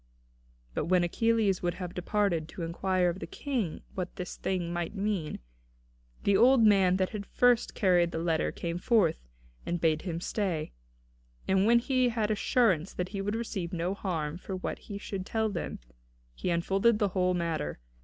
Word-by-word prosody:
But -, -, -1 dB
when 180 Hz, 0 st, +3 dB
Achilles 215 Hz, +1 st, +2 dB
would 175 Hz, -1 st, -1 dB
have 180 Hz, -1 st, -6 dB
departed, 180 Hz, -3 st, 0 dB
to 175 Hz, -, -6 dB
inquire 180 Hz, +2 st, +1 dB
of 180 Hz, -, -8 dB
the -, -, -6 dB
King 245 Hz, -, -3 dB
what 180 Hz, -1 st, -4 dB
this 180 Hz, -1 st, -5 dB
thing 175 Hz, -2 st, -2 dB
might 175 Hz, +3 st, -3 dB
mean, 195 Hz, -6 st, -2 dB, 0.9 s
the 200 Hz, -, +3 dB
old 250 Hz, +2 st, +6 dB
man 195 Hz, -4 st, +5 dB
that 185 Hz, -1 st, +1 dB
had 210 Hz, -, -4 dB
at 200 Hz, -, -12 dB
the -, -, -31 dB
first 245 Hz, -2 st, +4 dB
carried 175 Hz, -3 st, +3 dB
the 165 Hz, -, -5 dB
letter 165 Hz, -1 st, 0 dB
came 170 Hz, 0 st, -4 dB
forth, 185 Hz, -, +2 dB, 0.4 s
and 175 Hz, 0 st, -2 dB
bade 160 Hz, -2 st, +2 dB
him 170 Hz, -4 st, -3 dB
stay. 175 Hz, -5 st, -2 dB, 0.8 s
And 190 Hz, +2 st, +3 dB
when 235 Hz, +1 st, +6 dB
he 255 Hz, +1 st, +2 dB
had 220 Hz, -2 st, 0 dB
assurance 200 Hz, -5 st, +2 dB
that 180 Hz, 0 st, -3 dB
he 195 Hz, +1 st, -4 dB
would 205 Hz, +2 st, -2 dB
receive 200 Hz, -6 st, -4 dB
no 175 Hz, +2 st, -1 dB
harm 170 Hz, -5 st, -3 dB
for 190 Hz, -, -5 dB
what 185 Hz, -, -4 dB
he 200 Hz, -, -7 dB
should 195 Hz, -2 st, -5 dB
tell 220 Hz, +3 st, 0 dB
them, 190 Hz, -5 st, -4 dB, 0.6 s
he 180 Hz, -, -3 dB
unfolded 195 Hz, +6 st, +2 dB
the 205 Hz, -2 st, +1 dB
whole 185 Hz, -1 st, +1 dB
matter. 165 Hz, -, -2 dB
185 Hz, 185 wpm, -29 LUFS, 170-210 Hz, 0.9 s, old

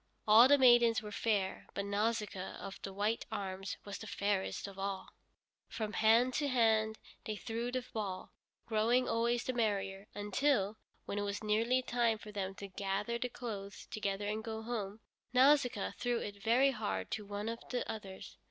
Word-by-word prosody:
All 220 Hz, +4 st, +9 dB
the 285 Hz, +1 st, +6 dB
maidens 240 Hz, -4 st, +6 dB
were 210 Hz, -, -7 dB
fair, 205 Hz, -3 st, -1 dB
but 200 Hz, -, -2 dB
Nausicaa 210 Hz, -2 st, -1 dB
of 195 Hz, -1 st, -8 dB
the 195 Hz, -, -5 dB
white 205 Hz, +4 st, -1 dB
arms 195 Hz, -2 st, -4 dB
was 200 Hz, -1 st, -6 dB
the 220 Hz, -, -8 dB
fairest 200 Hz, -1 st, -1 dB
of 195 Hz, -1 st, -10 dB
all. 195 Hz, -1 st, -3 dB, 0.6 s
From 215 Hz, -2 st, -4 dB
hand 230 Hz, +4 st, +4 dB
to 290 Hz, -, 0 dB
hand 220 Hz, -4 st, +3 dB, 0.3 s
they 215 Hz, -, -2 dB
threw 230 Hz, +3 st, -3 dB
the 255 Hz, -1 st, -2 dB
ball, 200 Hz, -4 st, -4 dB, 0.3 s
growing 230 Hz, +3 st, +2 dB
always 235 Hz, +1 st, +1 dB
the 255 Hz, -, -2 dB
merrier, 200 Hz, -4 st, -1 dB
until, 210 Hz, 0 st, +1 dB, 0.3 s
when 205 Hz, -, -3 dB
it -, -, 0 dB
was 205 Hz, +1 st, -3 dB
nearly 230 Hz, +4 st, +2 dB
time 235 Hz, -3 st, +1 dB
for 210 Hz, 0 st, -10 dB
them 195 Hz, -2 st, -3 dB
to 200 Hz, +1 st, -7 dB
gather 200 Hz, +4 st, -2 dB
the 250 Hz, -, -2 dB
clothes 205 Hz, -5 st, -6 dB
together 200 Hz, -1 st, -2 dB
and 215 Hz, +1 st, -2 dB
go 220 Hz, 0 st, -5 dB
home, 220 Hz, -2 st, -4 dB, 0.3 s
Nausicaa 255 Hz, -4 st, +4 dB
threw 245 Hz, -1 st, +1 dB
it 205 Hz, -2 st, -6 dB
very 250 Hz, +5 st, +4 dB
hard 95 Hz, -, -3 dB
to 215 Hz, -, -2 dB
one 205 Hz, +1 st, -5 dB
of 230 Hz, +1 st, -3 dB
the 250 Hz, -, -2 dB
others. 200 Hz, -4 st, -7 dB
215 Hz, 175 wpm, -34 LUFS, 200-235 Hz, 0.6 s, All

